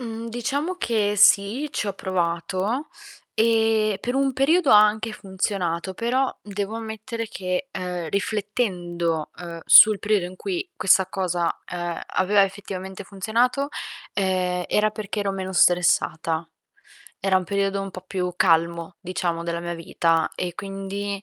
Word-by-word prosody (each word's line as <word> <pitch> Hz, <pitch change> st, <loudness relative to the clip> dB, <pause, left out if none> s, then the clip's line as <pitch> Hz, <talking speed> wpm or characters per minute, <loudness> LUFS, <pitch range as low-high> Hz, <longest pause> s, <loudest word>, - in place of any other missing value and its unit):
Mhmm, 230 Hz, -1 st, -6 dB
diciamo 280 Hz, +10 st, -2 dB
che 215 Hz, -, 0 dB
sì, 205 Hz, +8 st, +4 dB
ci -, -, -2 dB
ho -, -, -1 dB
provato 185 Hz, -, -2 dB, 0.5 s
e 220 Hz, -2 st, +2 dB
per 245 Hz, -, -3 dB
un 270 Hz, 0 st, +2 dB
periodo 285 Hz, +4 st, +3 dB
ha 210 Hz, 0 st, +9 dB
anche 215 Hz, +1 st, -1 dB
funzionato, 190 Hz, -3 st, -2 dB
però 255 Hz, +5 st, 0 dB
devo 205 Hz, +1 st, -4 dB
ammettere 225 Hz, +1 st, -5 dB
che, 185 Hz, +5 st, -3 dB
ehm, 180 Hz, -3 st, -4 dB
riflettendo, 180 Hz, -5 st, -2 dB
ehm, 170 Hz, -1 st, -7 dB
sul 215 Hz, -1 st, +9 dB
periodo 205 Hz, -3 st, +1 dB
in 185 Hz, +1 st, -10 dB
cui 375 Hz, -, -4 dB
questa 190 Hz, 0 st, +4 dB
cosa, 180 Hz, -3 st, -1 dB
ehm, 175 Hz, -1 st, -4 dB
aveva 200 Hz, +2 st, +3 dB
effettivamente 190 Hz, -1 st, -7 dB
funzionato, 230 Hz, +8 st, 0 dB, 0.4 s
ehm, 185 Hz, -2 st, 0 dB
era 215 Hz, 0 st, +2 dB
perché 210 Hz, 0 st, -4 dB
ero 200 Hz, -1 st, -1 dB
meno 190 Hz, -1 st, -4 dB
stressata. 170 Hz, -2 st, +2 dB, 0.7 s
Era 195 Hz, -1 st, +3 dB
un 185 Hz, -, 0 dB
periodo 200 Hz, +1 st, 0 dB
un 195 Hz, -, -6 dB
po' 185 Hz, -, -8 dB
più 180 Hz, -2 st, -2 dB
calmo, 170 Hz, 0 st, +2 dB
diciamo, 175 Hz, -2 st, -2 dB
della 170 Hz, 0 st, -3 dB
mia 175 Hz, 0 st, -4 dB
vita 165 Hz, 0 st, 0 dB
e 175 Hz, -2 st, -4 dB
quindi, 195 Hz, 0 st, -5 dB
195 Hz, 140 wpm, -24 LUFS, 180-220 Hz, 0.7 s, ha